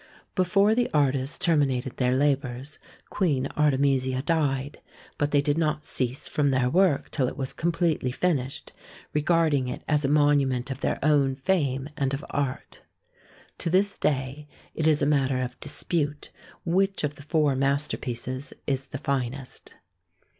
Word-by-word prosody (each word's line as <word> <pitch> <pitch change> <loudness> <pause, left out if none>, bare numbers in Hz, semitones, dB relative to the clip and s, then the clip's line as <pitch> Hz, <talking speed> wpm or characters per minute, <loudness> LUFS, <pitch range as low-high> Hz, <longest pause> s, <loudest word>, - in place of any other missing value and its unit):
Before 195 +3 +3
the 240 +1 +1
artists 135 -1 +1
terminated 135 -6 +1
their 125 0 +2
labours, 140 0 -1 0.3
Queen 145 -9 +1
Artemisia 135 -3 +2
died, 145 -4 -1 0.4
but 145 - +1
they 145 -1 +2
did 145 +2 +1
not 150 -1 0
cease 125 +1 -1
from 145 -2 +1
their 130 -2 +1
work 180 -5 +2
till 130 - 0
it - - -6
was 130 -1 -3
completely 165 -5 0
finished, 135 -3 -2 0.4
regarding 150 -3 +2
it 125 - -5
as 150 -1 +1
a - - +2
monument 140 -3 +2
of 135 - -5
their - - -1
own 140 -3 +3
fame 140 -3 0
and 140 -1 0
of 140 - -8
art. 140 -2 -3 0.8
To - - -1
this 195 +4 +2
day 140 +1 -1 0.3
it 160 - 0
is 150 -2 +3
a - - +4
matter 135 -3 +2
of 125 -1 -4
dispute 150 0 -2 0.3
which 195 +2 +1
of 150 -1 -1
the 145 - -14
four 150 -2 +1
masterpieces 135 -1 -1
is 135 -1 -2
the - - -6
finest. 135 -1 -4
140 Hz, 150 wpm, -26 LUFS, 130-155 Hz, 0.8 s, a